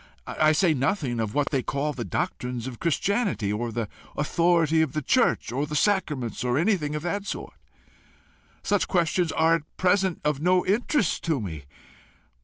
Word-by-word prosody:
I 155 0 +2
say 160 +1 +3
nothing 135 - -1
of 110 +1 -2
what 145 -1 +1
they 135 -3 +1
call 140 +4 -2
the - - -4
doctrines 125 -9 -3
of 125 -3 -7
Christianity, 175 - 0
or 115 +2 -2
the 115 -1 -3 0.3
authority 165 +1 +2
of 155 -4 0
the 155 -1 -2
church, - - +2
or 140 +4 -1
the 150 - -5
sacraments, 150 - 0
or 125 +1 +1
anything 160 -4 +1
of 150 - -4
that 200 +3 -3
sort. - - -5 1.1
Such 205 -1 +1
questions 175 -1 +1
are 160 +1 +3
at 160 -2 -3
present 185 -1 +2
of 150 -1 0
no 180 +2 +3
interest 215 - +1
to 160 -4 +1
me. 80 -9 -6
155 Hz, 170 wpm, -26 LUFS, 130-180 Hz, 1.1 s, say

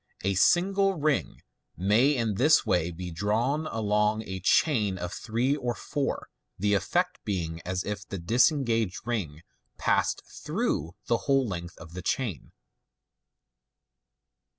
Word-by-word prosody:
A 100 +1 +1
single 195 - +3
ring 155 -3 -1 0.3
may 110 +10 +3
in 115 -3 0
this 145 +10 +4
way 90 -2 +1
be 90 +1 -6
drawn 115 - 0
along 105 -1 +1
a 95 -2 -5
chain 105 - +2
of 90 0 -5
three 120 +5 0
or 125 -4 -2
four, 140 -2 -3 0.3
the 105 +2 +1
effect 175 - 0
being 85 -5 -3
as 90 0 -1
if 105 0 -5
the 100 - -5
disengaged 115 - +1
ring 90 -10 -3 0.3
passed - - +1
through 80 +3 -3
the 115 - +2
whole 135 -2 +4
length 85 -3 -6
of 80 0 -12
the 90 - -5
chain. 105 - -2
105 Hz, 130 wpm, -28 LUFS, 90-130 Hz, 0.3 s, this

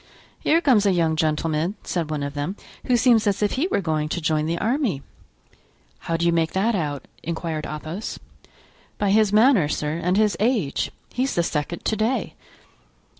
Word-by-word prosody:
"Here 330 +2 +3
comes 230 -10 +4
a - - +4
young 165 -2 +2
gentleman," 155 +3 0
said 170 -4 -2
one 150 -2 -2
of 140 0 -4
them, 145 +7 -3 0.3
"who 250 -2 +3
seems 235 -3 +4
as 200 +1 +1
if 205 - +2
he 290 +7 0
were 380 - 0
going 155 -3 -1
to 175 - -2
join 155 -1 0
the 170 +1 -1
army." 225 - 0 1.0
"How 165 - -2
do 170 - -1
you 170 - +4
make 165 -1 +1
that 210 +5 +1
out?" 145 - -3
inquired 160 -1 -3
Athos. 155 +7 -5 0.8
"By 205 -1 +1
his 215 -1 +4
manner, 215 - +5
sir, 150 +1 -2
and 180 +2 +2
his 215 -1 +3
age; 215 - +1 0.2
he's 260 +2 -1
the 170 - +2
second 165 +1 -3
to 220 - +1
day." 220 +5 -1
175 Hz, 180 wpm, -23 LUFS, 155-215 Hz, 1.0 s, manner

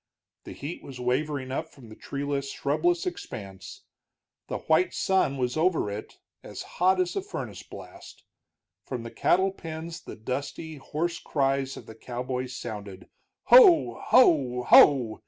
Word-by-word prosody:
The - - -8
heat 150 +5 -7
was 130 -2 -10
wavering 130 +2 -1
up 155 +4 -3
from 130 -7 -16
the 110 - -11
treeless, 140 +1 -4
shrubless 165 +5 0
expanse; 95 - -7 0.6
the - - -3
white 160 +3 +1
sun 190 -8 +1
was 125 -1 -1
over 160 - +1
it 105 +2 -8 0.2
as - - -8
hot 185 +1 +1
as 180 -1 0
a - - -1
furnace 405 - -7
blast. - - -13 0.6
From 125 -3 -6
the 115 - -8
cattle 190 +2 +2
pens 165 -2 -8
the - - -10
dusty, 140 +7 -5
hoarse 165 +5 -3
cries 135 -1 -1
of - - -10
the 110 - -11
cowboys 125 +2 -5
sounded, 100 -5 -8 0.3
"Ho, 405 -10 +6
ho, 135 - +4
ho!" 120 -4 +6
140 Hz, 145 wpm, -27 LUFS, 125-165 Hz, 0.6 s, Ho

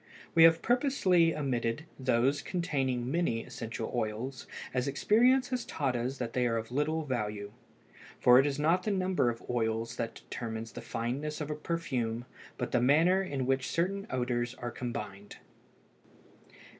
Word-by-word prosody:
We 165 0 +8
have 165 0 +5
purposely 210 - +3
omitted 130 0 -1
those 130 +2 +2
containing 135 -8 -1
many 155 -9 0
essential 115 -2 -5
oils, 120 +3 -3 0.3
as 125 0 0
experience 245 - +3
has 255 -2 -1
taught 135 -4 -2
us 125 +3 -2
that 120 -2 -4
they 125 -1 +2
are 115 -1 0
of 115 +1 -5
little 155 +4 0
value; 105 -6 -3 0.7
for 125 +1 +7
it 135 - +4
is 140 -1 -2
not 165 +5 +3
the 215 - -2
number 185 -9 +1
of 115 -1 -6
oils 115 0 -1
that 115 0 -3
determines 115 -1 -6
the - - -8
fineness 140 +6 -3
of 150 -1 -3
a - - -2
perfume, 125 -8 -2 0.3
but - - -3
the 125 - +2
manner 165 +9 +4
in 140 -9 -2
which 130 0 +1
certain 195 +4 -1
odors 125 -1 -1
are 120 -1 -5
combined. 105 -4 -6
130 Hz, 155 wpm, -31 LUFS, 120-165 Hz, 0.7 s, We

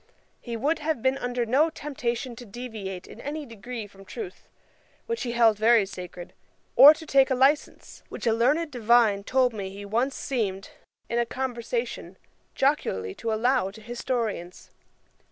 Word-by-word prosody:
He 235 -2 -5
would 300 +7 0
have 305 -5 -2
been 265 +1 +2
under 245 -1 -1
no 275 +8 +3
temptation 260 -5 -4
to 245 - -9
deviate 210 -5 -7
in 235 - -12
any 295 +1 -5
degree 230 -1 -7
from 195 -1 -15
truth, 385 - -8 0.6
which 465 0 -3
he 240 -3 -2
held 225 -3 +4
very 225 -1 +5
sacred, 180 -2 -9 0.4
or 295 +3 +10
to 320 - -10
take 270 -3 +4
a 260 - +2
licence, 275 +4 +1
which - - -7
a 225 - +3
learned 290 +8 +2
divine 230 -4 +3
told 255 +1 +2
me 200 -3 -5
he 200 +1 -9
once 240 +7 0
seemed, 200 -7 -3 0.4
in 235 - 0
a 235 - +2
conversation, 260 - -4 0.4
jocularly 95 - 0
to 230 - -4
allow 235 -1 +2
to 205 +3 -12
historians. 230 -6 -4
240 Hz, 160 wpm, -26 LUFS, 215-270 Hz, 0.6 s, or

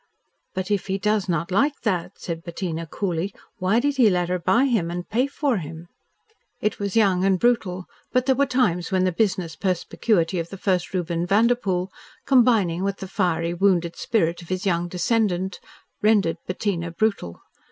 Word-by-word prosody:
"But 185 +2 -3
if 200 -2 0
he 190 0 0
does 210 -1 0
not 170 +1 -1
like 280 +9 +1
that," 185 -7 -1
said 165 -2 -5
Bettina 165 -2 -4
coolly, 180 +2 -2 0.3
"why 190 +5 +2
did 285 +2 0
he 240 -5 +6
let 180 -2 0
her 180 0 0
buy 235 +9 +3
him 220 -11 +1
and 175 +1 -5
pay 245 +5 +1
for 280 -4 0
him?" 165 0 -8 0.7
It 210 - -1
was 200 -2 -3
young 195 -5 +3
and 190 -1 +3
brutal, 190 -6 +1 0.3
but 255 0 +2
there 265 - +4
were 280 +2 +2
times 190 -11 +1
when 185 -1 +2
the 185 - +2
business 185 -3 -1
perspicuity 185 -1 0
of 165 0 -4
the 195 - -8
first 185 -2 0
Reuben 170 -1 -1
Vanderpoel, 200 -3 +2 0.3
combining 225 -10 +3
with 200 0 -1
the 190 - -7
fiery, 170 -3 0
wounded 175 -2 +2
spirit 175 -6 0
of 170 - -13
his 185 +1 -2
young 175 -2 +1
descendant, 190 0 0 0.4
rendered 205 -6 +3
Bettina 185 -2 -2
brutal. 175 - -1
185 Hz, 175 wpm, -23 LUFS, 175-215 Hz, 0.7 s, he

